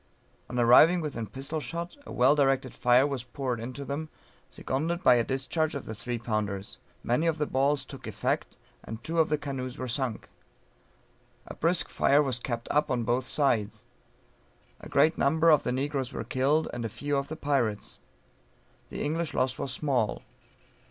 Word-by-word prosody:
On 125 - -4
arriving 125 +9 +7
within 140 -9 -4
pistol 135 - -4
shot 170 +3 -5
a - - -8
well 130 +3 +4
directed 135 -3 +1
fire 125 +2 +4
was 140 -4 -2
poured 125 -1 -3
into 130 +4 -6
them, 150 +3 -4 0.4
seconded 165 +7 -2
by - - +7
a 120 -1 +3
discharge 135 +5 -1
of 140 - -5
the 110 - -5
three 120 +2 -4
pounders; 105 -4 -3 0.2
many 125 +8 +1
of 165 -1 +1
the 150 - 0
balls 140 +1 +1
took - - -10
effect, - - -2 0.3
and 110 +1 -8
two 165 +1 -1
of 160 - +4
the 150 - +2
canoes 135 -3 -5
were 130 - -4
sunk. 125 -2 -2 1.2
A - - -8
brisk 170 +2 +1
fire 145 +2 +3
was 130 -4 -1
kept 120 -1 -4
up 150 +1 +2
on 125 -2 0
both 125 +3 0
sides; 120 -6 0 0.9
a - - -11
great 160 +2 +3
number 160 +4 +4
of 150 - +5
the - - -2
negroes 135 0 -2
were - - -4
killed, 145 +5 +1
and 120 -1 -4
a 115 - -2
few 145 +7 -3
of 140 0 -1
the 155 - -5
pirates; 130 -9 -1 0.9
the - - -4
English 160 +1 -2
loss 130 0 0
was 135 - -3
small. 130 -6 -1
135 Hz, 180 wpm, -28 LUFS, 120-150 Hz, 1.2 s, arriving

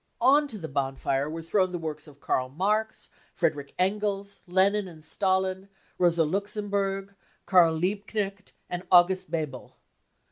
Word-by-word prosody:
On 280 +5 +5
to 225 - -5
the 165 -5 -6
bonfire 135 0 -1
were 165 +1 -5
thrown 185 +2 +1
the 180 - -3
works 155 -2 -6
of 145 -2 -16
Karl 130 -2 -1
Marx, 210 +9 -1 0.2
Friedrich 145 -2 -1
Engels, 200 +1 -1
Lenin 190 +3 +2
and 160 -3 -13
Stalin, 190 +1 0 0.3
Rosa 170 -2 +4
Luxemburg, 200 +2 -2 0.3
Karl 170 -4 +5
Liebknecht 200 +2 -3
and 180 0 -4
August 185 0 +5
Bebel. 155 -6 -4
185 Hz, 135 wpm, -27 LUFS, 160-200 Hz, 0.3 s, On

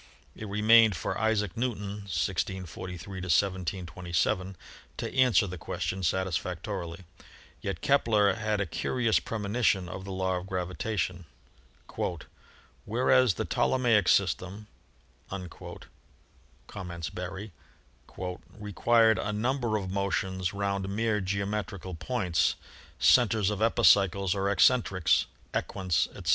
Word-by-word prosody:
It 110 - -7
remained 110 +1 +5
for - - -3
Isaac 105 -3 0
Newton 105 -4 -3
(1643 95 +1 -3
1727) 90 +1 -1 0.4
to - - -4
answer 125 -4 +4
the 90 -2 -6
question 95 +4 -3
satisfactorily; 90 -1 -2 0.6
yet 95 -4 -4
Kepler 110 -8 +3
had 105 +1 -1
a 100 - 0
curious 115 +7 0
premonition 105 -3 0
of 95 +3 -7
the 100 - -7
law 95 -1 -1
of 90 +1 -7
gravitation. 90 0 -3 1.6
"Whereas 125 -1 +3
the - - -2
Ptolemaic 115 -7 +2
system," 95 +2 +1 0.6
com 95 -2 -6 1.4
ments 85 -2 -5
Berry, 95 +3 -6 1.1
"required 110 +2 +3
a 105 - -2
number 120 +1 0
of 95 -3 -4
motions 95 -2 -1
round 100 -1 -2
mere 110 +1 0
geometrical 100 -1 -3
points, 90 -1 0 0.4
centers 110 -5 +4
of 105 0 -4
epicycles 100 -5 +4
or 100 -1 0
eccentrics, 100 -4 +3 0.3
equants, 90 -6 0
etc. - - -4
100 Hz, 105 wpm, -28 LUFS, 90-110 Hz, 1.6 s, remained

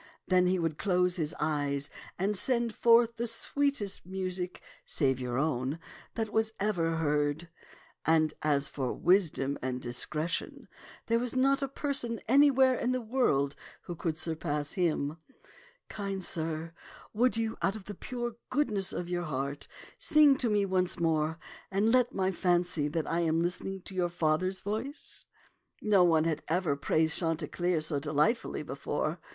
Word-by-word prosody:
Then 180 -1 +4
he 185 +1 +2
would 165 -3 -2
close 180 -2 +2
his 155 -3 -1
eyes 145 -2 -1 0.3
and 200 +3 0
send 235 +2 +1
forth 235 0 +4
the 235 +1 -1
sweetest 275 -4 -1
music, 185 -1 -4 0.2
save 135 -4 +1
your 125 -1 -3
own, 135 -1 0 0.4
that 220 -2 -3
was 220 0 +1
ever 175 -5 0
heard; 150 +1 0 0.5
and 155 -1 +3
as 145 -2 +2
for 130 -3 -3
wisdom 165 -7 +2
and 125 0 -2
dis 120 -1 -1
cretion, 155 +3 -3 0.4
there 230 0 +2
was 245 +1 -2
not 275 +2 +3
a 275 - 0
person 270 -4 -3
anywhere 265 0 +5
in 250 0 0
the 255 - 0
world 220 - +1 0.3
who 175 - -6
could 160 -1 -3
surpass 150 -3 -1
him. 160 -5 0 0.7
Kind 195 -2 -4
sir, 165 0 -2 0.4
would 240 +2 +2
you 225 0 -1
out 195 - +1
of 210 -3 -9
the 205 - -6
pure 240 +3 -5
goodness 215 -9 0
of 175 - -4
your 175 0 -2
heart 140 -1 -3 0.3
sing 300 -2 +6
to 245 -4 +1
me 205 -1 +2
once 185 -1 0
more, 160 -1 +1 0.3
and 200 +4 +2
let 250 0 +4
me 190 -3 0
fancy 175 -4 +1
that 155 +1 -2
I 165 - -1
am 165 -1 +1
listening 180 +2 -2
to 195 - -8
your 180 -2 0
father's 175 +3 0
voice? 220 +9 -5 0.3
" - - -45 0.2
No 205 -4 +4
one 165 -3 +4
had 160 -2 -1
ever 165 -3 +1
praised 160 +3 +1
Chanticleer 170 0 0
so 155 -2 0
delightfully 150 - 0
before. 150 +4 -3
180 Hz, 160 wpm, -30 LUFS, 155-220 Hz, 0.7 s, sing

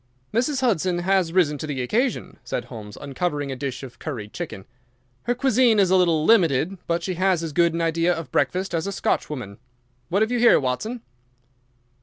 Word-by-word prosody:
"Mrs. 255 +4 +1
Hudson 185 -7 +1
has 185 -1 +1
risen 160 -5 +2
to 155 - -5
the 140 -3 -3
occasion," 240 - -1
said - - -4
Holmes, 105 -4 -10
uncovering 145 0 -3
a - - -3
dish 130 0 -5
of 130 -2 -10
curried 115 -9 -6
chicken. 95 - -6 0.6
"Her 245 - +1
cuisine 250 -3 +3
is 190 -3 +3
a - - +5
little 170 -4 +3
limited, 175 - +3
but 170 0 0
she 185 - -2
has 185 -1 +1
as 160 -3 -4
good 170 0 +3
an 170 - -1
idea 165 +1 +1
of 165 -2 -4
breakfast 185 0 0
as 165 +3 -1
a - - -2
Scotch 195 - -1
woman. 115 -9 -7 0.5
What 195 +5 +2
have 220 - -2
you 245 - +1
here, 240 0 +6
Watson?" 215 - -3
170 Hz, 195 wpm, -23 LUFS, 145-195 Hz, 0.6 s, here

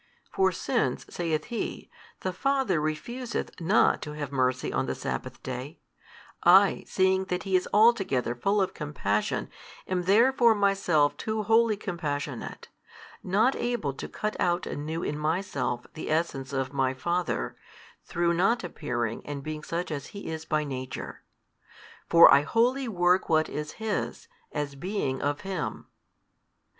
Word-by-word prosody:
For 385 0 +3
since - - -1
(saith 165 -3 -1
He) 235 -2 -5 0.3
the 185 - -2
Father 265 - +1
refuseth 230 +11 -3
not 190 +7 +3
to 150 - -6
have 145 -2 -5
mercy 130 -2 0
on - - 0
the - - -2
sabbath - - -5
day, - - -6 0.6
I, 190 +3 +6
seeing 190 0 +2
that 180 -1 -2
He 195 -1 0
is 185 - +1
altogether 195 - +3
full 195 - +1
of 190 - -3
compassion, 105 -9 -1 0.4
am 185 -1 0
therefore 235 +3 +5
Myself 195 -7 +2
too 220 -1 -2
wholly 225 0 +3
compassionate, 150 - -4 0.5
not 215 +8 +2
able 235 - -1
to - - -7
cut 215 0 -3
out 175 0 +1
anew 160 +3 -4
in 150 - -2
Myself 150 -6 -1
the 155 - -6
Essence 150 -4 -1
of 135 0 -2
My 130 -1 +1
Father, 170 - -1 0.5
through 170 0 0
not 195 +7 +2
appearing 120 -9 -3
and 145 -1 -6
being 155 0 -5
such 170 +1 -3
as 145 -2 -4
He 200 - -6
is 160 0 -5
by 155 -1 0
Nature. 130 -3 -6 0.9
For 170 0 +9
I 140 - +7
wholly 245 - +1
work 180 -3 +2
what 160 -1 +3
is 150 0 -5
His, 220 - -3 0.2
as 145 -1 -3
being 140 -3 -2
of 145 0 -1
Him. 190 -1 -4
170 Hz, 145 wpm, -27 LUFS, 145-200 Hz, 0.9 s, For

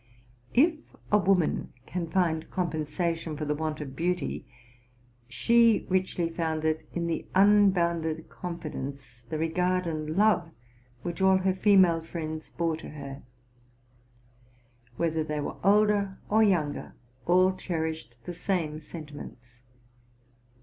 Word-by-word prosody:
If 310 +4 +2 0.2
a 210 - +6
woman 185 -3 +1
can 175 -2 -4
find 165 -3 0
compensation 165 -2 -2
for 150 - -3
the 150 - 0
want 155 0 -3
of 135 -2 -7
beauty, 180 +4 -2 0.8
she 230 - +4
richly 185 -2 +1
found 160 -1 -2
it 155 0 -1
in 170 -1 -2
the 165 -1 -2
unbounded 175 -5 +3
confidence, 140 -8 -7
the 160 - -2
regard 180 +3 0
and 155 0 -3
love, 205 -5 +3 0.5
which 175 +2 -4
all 190 0 +5
her 190 0 +1
female 190 -4 +5
friends 160 -1 -6
bore 165 -2 0
to - - -9
her; 140 -2 -8 1.8
whether 160 -1 0
they 150 -1 -3
were 145 - -4
older 205 0 +3
or 220 +1 +4
younger, 175 -9 +1 0.3
all 185 +2 +5
cherished 160 -9 -4
the 175 - -6
same 170 -4 -1
senti 155 -1 -9
ments. 125 -4 -11
170 Hz, 125 wpm, -28 LUFS, 155-185 Hz, 1.8 s, a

